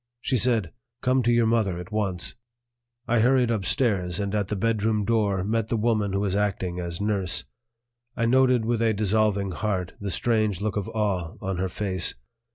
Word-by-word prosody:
She 130 +1 0
said: 115 -7 +1 0.3
"Come 130 +1 +3
to 120 0 +2
your 120 -1 +3
mother 110 -6 +1
at 90 0 -8
once." 100 -5 -2 0.7
I 120 0 +2
hurried 125 +1 +3
upstairs, 100 -4 0
and 100 -1 -2
at 105 -2 0
the 105 - -2
bedroom 110 0 0
door 100 -4 +1
met 110 +2 0
the 115 - -1
woman 110 -3 +1
who 100 - 0
was 100 -2 0
acting 95 -3 -1
as 85 -1 -4
nurse. 95 -4 -1 0.7
I 115 - +1
noted 125 -1 +3
with 115 0 0
a 110 -2 +2
dissolving 105 -1 +1
heart 95 0 -2
the 100 - -4
strange 110 0 +1
look 105 -1 -2
of 105 0 -2
awe 100 -5 -1
on 95 -2 -3
her 95 +1 -1
face. 95 -3 0
105 Hz, 180 wpm, -25 LUFS, 95-115 Hz, 0.7 s, Come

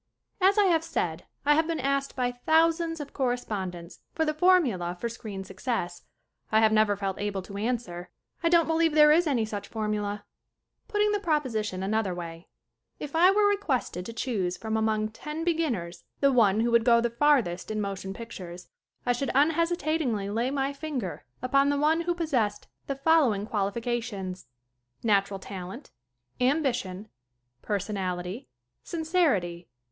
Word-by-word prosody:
As 390 +3 +5
I 415 - +6
HAVE 330 -4 +3
said, - - -2 0.2
I 295 - +6
have 320 +2 +2
been 330 -1 -2
asked 275 +1 -1
by 250 -1 0 0.2
thous 325 +1 +4
ands 330 -1 -3
of 290 -1 -7
correspondents 200 -9 -3 0.2
for 320 - +1
the 305 - 0
formula 275 - +2
for 235 - -2
screen 205 -4 -7
success. 190 -2 -4 0.5
I 220 - +5
have 220 -1 +5
never 215 -2 +3
felt 195 -1 -3
able 205 -2 -2
to 200 +2 -8
an 240 +4 +1
swer. 175 -5 -9 0.3
I 335 - +2
don't 340 -1 +5
believe 325 -1 +2
there 300 -1 +7
is 330 +2 +4
any 245 -7 +1
such 205 -2 -5
formula. 210 -2 -3 0.6
Putting 420 -1 +2
the 415 - +1
proposition 235 - -1
another 200 -2 0
way: 170 -1 -8 0.5
If 295 +1 -6
I 350 +3 +6
were 410 +2 +4
requested 285 - -1
to - - -5
choose 205 -7 -2
from 220 +2 -3
among 215 -1 +1
ten 300 +8 -6
beginners 295 - -1 0.2
the 275 -1 +4
one 215 -3 +4
who 235 +1 +1
would 235 -1 +4
go 235 -1 +5
the 235 0 0
farth 285 +1 +4
est 175 +1 -6
in 215 0 -2
motion 195 -2 -4
pictures 180 -5 -9 0.4
I 245 - +3
should 270 +3 -2
unhesitatingly 310 - +1
lay 230 +4 0
my 275 0 -1
finger 280 - -5 0.2
upon 275 +2 +3
the 285 - +1
one 310 +3 +3
who 345 +1 -1
possessed 250 -12 -1 0.2
the 275 - -2
following 275 -8 +3
qualifications: 205 -2 -3 0.6
(1) - - -2
Natural 195 -1 +2
talent. 190 +7 -8 0.5
(2) 250 - +3
Ambition. 255 -10 0
(3) 215 - -26 0.5
Personality. 190 0 -3 0.3
(4) - - -44
Sincerity. 290 - 0
235 Hz, 170 wpm, -27 LUFS, 200-305 Hz, 0.6 s, there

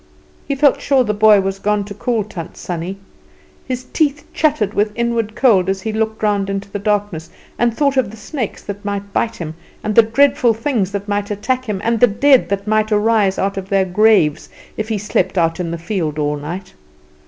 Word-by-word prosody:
He 280 - -1
felt 280 0 +3
sure 270 -2 +3
the 210 -3 -1
boy 210 -1 +5
was 195 0 -3
gone 210 0 0
to 205 +1 -8
call 225 +2 -1
Tant 175 -4 -8
Sannie. 180 +2 -5 0.7
His 255 -1 -3
teeth 290 -2 0
chattered 285 -10 +1
with 210 0 +1
inward 235 -2 -1
cold 195 -8 +3
as 190 0 -2
he 220 - -2
looked 220 0 -2
round 200 -2 +1
into 195 0 -4
the 205 - -3
darkness 205 -5 -1 0.3
and 240 0 +3
thought 280 -2 +1
of 260 -6 +2
the 220 - -11
snakes 235 +1 -5
that 205 0 -7
might 200 -1 -4
bite 230 0 0
him, 160 -6 -6 0.3
and 215 - -1
the 230 - +8
dreadful 240 0 +3
things 225 -5 -1
that 200 0 -4
might 205 0 -1
attack 250 +5 -2
him, 205 -4 -3
and 230 0 +1
the 245 - +7
dead 260 +5 +3
that 200 0 -2
might 215 0 +1
arise 210 -2 +2
out 195 0 -1
of 190 0 -5
their 195 -1 +2
graves 190 -5 +3 0.3
if 215 +1 -4
he 220 - 0
slept 190 -2 -1
out 165 0 +1
in 175 -2 -2
the 170 - -3
field 165 -3 -3
all 150 -1 0
night. 170 +6 -7
210 Hz, 210 wpm, -18 LUFS, 195-230 Hz, 0.7 s, the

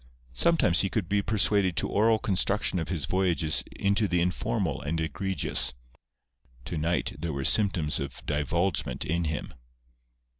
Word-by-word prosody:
Sometimes 90 - +3
he 100 - 0
could 105 -4 -2
be 100 +2 +1
persuaded 100 -3 +1
to - - 0
oral 110 +2 +3
construction 95 -2 0
of 80 - -4
his 85 -7 -2
voyages 90 -4 +1
into 100 +2 +1
the 90 -2 +1
informal 85 -8 -1
and 80 +3 -2
egregious. 80 -5 -1 0.9
To 85 - -4
night 85 +3 0
there 80 0 -3
were 70 -1 -3
symptoms 90 -9 +2
of 70 -2 -6
divulgement 75 +2 -1
in 85 +2 -1
him. 75 -3 -4
85 Hz, 145 wpm, -27 LUFS, 75-100 Hz, 0.9 s, Sometimes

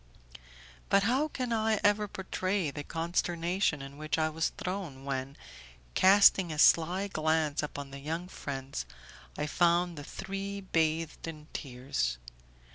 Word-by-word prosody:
But 200 0 +4
how 260 +8 +2
can 255 -5 -3
I 220 -1 +2
ever 205 +1 +3
portray 190 -3 -2
the 145 +1 -6
consternation 170 -1 0
in 135 +1 -10
which 155 +1 -1
I 155 0 +2
was 160 0 0
thrown 180 -8 -5
when, 135 0 -3 0.6
casting 190 -2 +6
a 155 - -4
sly 175 +5 +4
glance 155 -4 +1
upon 145 -2 -6
the 140 - -7
young 165 +5 -4
friends, 135 - -5 0.5
I 150 - -1
found 170 +1 +2
the - - -7
three 195 +5 -5
bathed 165 -3 -1
in 155 -2 -8
tears! 125 - -2
165 Hz, 135 wpm, -30 LUFS, 145-190 Hz, 0.6 s, casting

